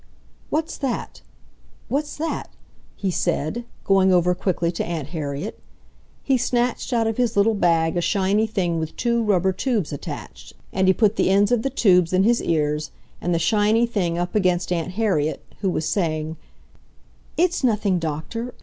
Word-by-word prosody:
"What's 320 +2 -2
that? 265 -4 -3 0.7
What's 295 +2 -2
that?" 320 +2 -3 0.5
he 195 -2 -2
said, 175 +6 -1 0.2
going 190 -1 +4
over 180 0 +4
quickly 175 -2 -1
to 170 - -3
Aunt 160 -5 -4
Harriet. 150 +3 -4 0.6
He 270 -2 +2
snatched 245 +1 0
out 230 -2 +2
of 225 -1 -1
his 240 -3 0
little 215 +3 +4
bag 165 -4 +2
a 175 - +1
shiny 200 +4 +1
thing 180 -6 -1
with 160 -1 -4
two 235 -1 +1
rubber 190 -3 +2
tubes 210 - -1
attached, 65 - -8 0.2
and 190 0 +2
he 190 - +6
put 215 -2 +2
the - - +2
ends 200 +2 +3
of 240 -2 +3
the 270 - -1
tubes 185 -9 +3
in 185 +1 +4
his 235 +3 +3
ears 150 -2 0 0.3
and 175 - -1
the 170 - +2
shiny 215 +6 +3
thing 180 -7 -1
up 175 0 -2
against 180 -4 +1
Aunt 175 +1 -1
Harriet, 185 -8 0
who 195 - 0
was 155 -3 -1
saying, 160 -3 -1 1.0
"It's 350 -2 +1
nothing, 210 -6 +2
Doctor 165 +10 -4
190 Hz, 165 wpm, -23 LUFS, 170-225 Hz, 1.0 s, he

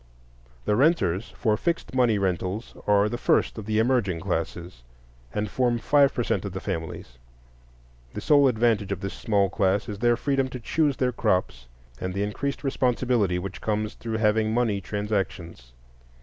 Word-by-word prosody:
The 105 - +2
renters 120 - +2
for 110 -3 +2
fixed 170 +8 -2
money 125 -4 +3
rentals 95 +3 -2
are 105 0 +4
the 120 +2 -4
first - - +1
of 105 - -8
the 110 -1 0
emerging 110 -7 +1
classes, 85 -3 -4 0.5
and 105 +8 -2
form 120 +3 +1
five 140 +4 +4
per 120 - -2
cent 100 - -1
of 100 -3 -5
the 95 - -4
families. 80 -9 -6 1.0
The - - -4
sole 145 -2 +5
advantage 110 -4 +1
of 100 -1 -3
this 100 -1 -4
small 100 -3 +1
class 100 0 +1
is 105 -3 -6
their 120 0 +3
freedom 135 0 0
to 125 -1 -7
choose 145 +2 0
their 125 +1 +1
crops, 90 - -1 0.3
and 90 0 -4
the 100 - 0
increased 140 +9 -3
responsibility 125 -7 +1
which 95 +1 -6
comes 105 0 -1
through 115 -1 -4
having 110 0 +2
money 110 -5 +1
transactions. 95 - -4
105 Hz, 165 wpm, -25 LUFS, 95-120 Hz, 1.0 s, sole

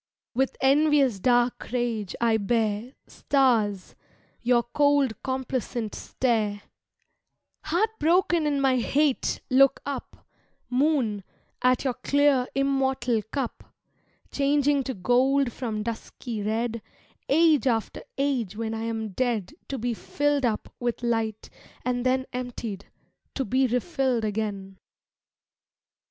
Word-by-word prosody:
With 265 +2 0
envious 275 -4 +4
dark 245 +2 +1
rage 235 -5 -2
I 230 -1 +3
bear, 220 +2 -1
Stars, 225 -8 +1 0.5
your 240 0 +3
cold 285 -1 +2
complacent 255 -4 -3
stare; 215 -5 -1 1.0
Heart 360 +8 +1
broken 335 0 +3
in 285 -1 +1
my 265 -2 +3
hate 280 +3 +1
look 275 +1 +5
up, 280 -2 -6 0.5
Moon, 250 -7 +1 0.4
at 250 0 +3
your 260 -2 0
clear 280 -1 +2
immortal 265 -4 +1
cup, 270 -5 -5 0.6
Changing 285 0 +2
to 260 - -3
gold 250 +5 +2
from 220 -4 -3
dusky 230 0 -5
red 225 +2 -1 0.5
Age 310 -2 +4
after 225 -3 -1 0.2
age 260 -8 -1
when 225 0 -3
I 225 0 -3
am 225 -1 -3
dead 235 +2 -1 0.2
To 275 - -3
be 245 0 -1
filled 290 +4 0
up 215 -2 -3
with 240 0 -2
light, 225 -2 -1 0.4
and 245 -1 0
then 260 +1 +1
Emptied, 240 -5 -5 0.5
to 270 - -1
be 260 +5 +2
refilled 250 -2 0
again. 200 -3 -4
250 Hz, 115 wpm, -26 LUFS, 225-275 Hz, 1.0 s, look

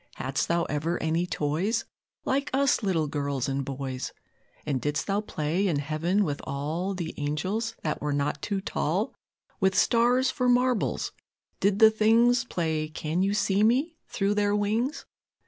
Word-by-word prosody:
Hadst 130 +1 -1
Thou 170 0 +2
ever 160 +4 -1
any 165 +2 0
toys, 180 +9 -1 0.4
Like 275 +2 0
us 275 -1 +3
little 180 -7 +1
girls 140 -3 -2
and 135 0 -1
boys? 130 -1 -4 0.5
And 135 -4 -1
didst 150 0 -1
Thou 200 +1 0
play 170 0 -1
in 165 -6 +1
Heaven 155 +7 0
with 145 -6 -2
all 155 +8 -2
The 170 -3 -4
angels, 190 +11 -2
that 155 - -2
were 150 - -1
not 145 0 -1
too 200 -2 -2
tall, - - -1 0.5
With 190 0 +2
stars 245 +3 +3
for 250 -1 0
marbles? 250 -1 +1 0.5
Did 200 0 +2
the 220 0 +8
things 235 +4 +4
Play 160 -7 -1
Can 155 +3 -2
you 200 +2 +1
see 200 0 +2
me? 265 +10 +2
through 200 +1 0
their 205 0 +2
wings? 220 +8 -1
185 Hz, 160 wpm, -27 LUFS, 150-220 Hz, 0.5 s, the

